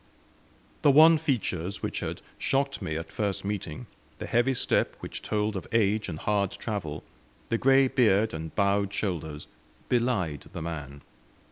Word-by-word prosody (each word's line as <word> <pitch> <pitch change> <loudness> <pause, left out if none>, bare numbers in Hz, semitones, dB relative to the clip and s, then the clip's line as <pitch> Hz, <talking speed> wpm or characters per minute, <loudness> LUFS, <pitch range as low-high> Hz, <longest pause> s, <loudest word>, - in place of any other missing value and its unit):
The - - +5
wan 160 +3 +8
features 100 - -2
which - - -2
had - - -5 0.2
shocked 135 0 0
me 80 - -3
at 80 0 -6
first 100 -2 -2
meeting, 100 -7 -4 0.3
the - - -5
heavy 120 +3 +2
step - - +1
which - - -7
told 105 0 -1
of 95 - -5
age 105 -2 +2
and 80 - -4
hard 100 +1 +1
travel, 90 -10 -4 0.5
the 115 - +1
grey 135 0 +5
beard 110 -4 +3
and 80 0 -6
bowed 100 0 +2
shoulders, 80 -7 -3 0.4
belied 115 - 0
the - - -5
man. 75 -4 -6
100 Hz, 150 wpm, -28 LUFS, 85-120 Hz, 0.5 s, wan